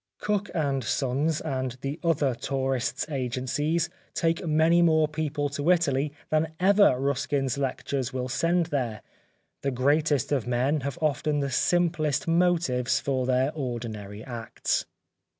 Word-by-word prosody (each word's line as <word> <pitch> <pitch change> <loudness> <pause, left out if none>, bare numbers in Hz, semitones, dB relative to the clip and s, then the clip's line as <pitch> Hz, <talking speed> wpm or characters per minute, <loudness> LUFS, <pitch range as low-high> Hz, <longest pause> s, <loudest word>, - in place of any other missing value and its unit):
Cook 205 -1 -1 0.2
& 135 -1 0
Sons 140 +6 0
and 130 -4 -3
the 140 +3 -4
other 150 -6 +2
tourists' 130 0 -1
agencies 140 +4 -1 0.3
take 165 +2 +1
many 160 +2 +4
more 160 -2 +4
people 150 -1 -2
to 145 +3 -2
Italy 150 -5 +2 0.2
than 155 +1 0
ever 195 -8 +5
Ruskin's 135 -1 0
lectures 135 -1 -2
will 130 -1 -3
send 165 +6 +1
there. 120 -6 -2 0.6
The 140 - 0
greatest 145 +2 +1
of 130 -5 0
men 130 +5 +1
have 140 -1 -4
often 150 0 +1
the 140 -1 -1
simplest 165 0 +1
motives 165 -7 +2
for 130 -2 -1
their 130 +2 +2
ordinary 110 -7 -5
acts. 120 -2 -2
140 Hz, 135 wpm, -27 LUFS, 130-160 Hz, 0.6 s, ever